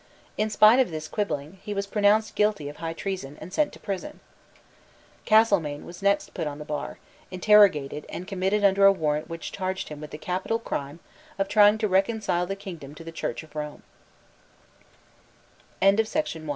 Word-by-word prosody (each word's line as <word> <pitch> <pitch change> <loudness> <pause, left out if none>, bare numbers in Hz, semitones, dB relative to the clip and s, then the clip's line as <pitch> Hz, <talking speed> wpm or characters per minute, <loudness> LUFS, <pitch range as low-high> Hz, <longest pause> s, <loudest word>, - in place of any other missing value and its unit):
In 215 +1 0
spite 215 +3 +6
of 260 - +3
this 155 -1 -5
quibbling, 165 -4 -3
he 210 - -5
was 200 0 -1
pronounced 210 +1 +2
guilty 210 -8 +1
of 145 - -11
high 165 0 -4
treason, 165 -6 -5
and 185 - -10
sent 300 -1 +1
to - - -12
prison, 200 +10 -5 1.1
Castlemaine 200 -10 +3
was 175 - -10
put - - -14
next 200 0 +2
to 150 -4 -3
the 150 - -8
bar, 150 -1 -5 0.3
interrogated, 180 -7 +4
and 180 - -7
committed 195 +1 0
under 195 0 +5
a 195 - +9
warrant 155 -5 -1
which 165 0 -6
charged 190 0 -3
him 150 -1 -8
with 150 - -8
the - - -8
capital 185 +7 -2
crime 150 -8 -5 0.4
of 195 0 0
trying 210 +1 +5
to 220 -1 0
reconcile 190 -2 +1
the 195 - -3
kingdom 170 -8 -9
to 165 - -10
the 165 - -8
Church 160 -4 -4
of 155 -1 -18
Rome, 150 -1 -6 2.0
[5 195 +2 +5
190 Hz, 175 wpm, -26 LUFS, 155-205 Hz, 2.0 s, a